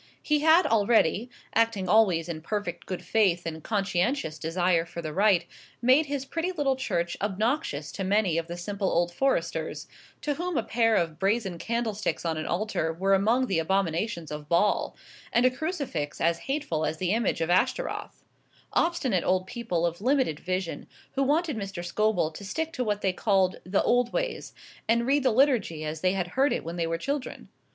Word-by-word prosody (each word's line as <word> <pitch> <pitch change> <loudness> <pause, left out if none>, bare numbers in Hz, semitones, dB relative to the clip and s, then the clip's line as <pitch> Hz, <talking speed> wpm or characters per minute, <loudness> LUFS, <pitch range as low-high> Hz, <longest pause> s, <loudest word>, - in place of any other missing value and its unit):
He 300 0 +2
had 320 +3 +5
already, 225 - +3 0.2
acting 225 -4 +1
always 185 -5 +4
in 160 -2 -5
perfect 205 +5 -4
good 185 - -4
faith 190 -6 +2
and 160 -1 -5
conscientious 195 - -1
desire 170 +1 +1
for 170 0 -9
the 155 -2 -4
right, 195 -2 +3 0.3
made 260 +5 +4
his 275 -1 -3
pretty 335 +5 -2
little 290 -6 0
church 175 -10 -2
obnoxious 205 - -1
to 195 - -4
many 190 -3 +2
of 165 - -5
the 175 0 -6
simple 195 +2 -2
old 175 0 +1
Foresters, 270 +7 -1 0.3
to 295 - -1
whom 345 +1 -3
a 230 - +1
pair 225 -1 +2
of 165 -4 0
brazen 195 -2 0
candlesticks 225 -4 -2
on 165 -1 0
an 155 - -4
altar 175 -3 -1
were 190 +4 +1
among 225 +7 +3
the 190 -8 0
abominations 170 0 -1
of 150 -1 -7
Baal, 175 +5 +2 0.4
and 240 - +3
a 255 - +5
crucifix 260 - -3
as 170 0 +1
hateful 270 - -1
as 155 - -1
the 180 +2 -1
image 225 -3 +1
of 165 +1 0
Ashtaroth; 345 - -1 0.5
obstinate 270 - +1
old 185 0 +1
people 190 -7 -2
of 170 +2 -3
limited 255 - +1
vision, 185 -1 -3 0.2
who 275 - -1
wanted 300 +3 +1
Mr. 195 -4 -5
Scobel 180 -3 +1
to 200 - -10
stick 320 +11 -3
to 255 - -1
what 210 -2 -1
they 190 -2 +1
called 190 -2 +2
the 185 +2 +1
old 245 0 +2
ways, - - -3 0.3
and 235 +1 +2
read 280 +3 +3
the 260 - +3
Liturgy 225 - +2
as 155 0 -4
they 185 0 +2
had 180 -2 -2
heard 270 +8 +2
it - - -2
when 170 +2 -6
they 165 -1 0
were 165 0 -1
children. 275 - -4
200 Hz, 185 wpm, -27 LUFS, 170-250 Hz, 0.5 s, had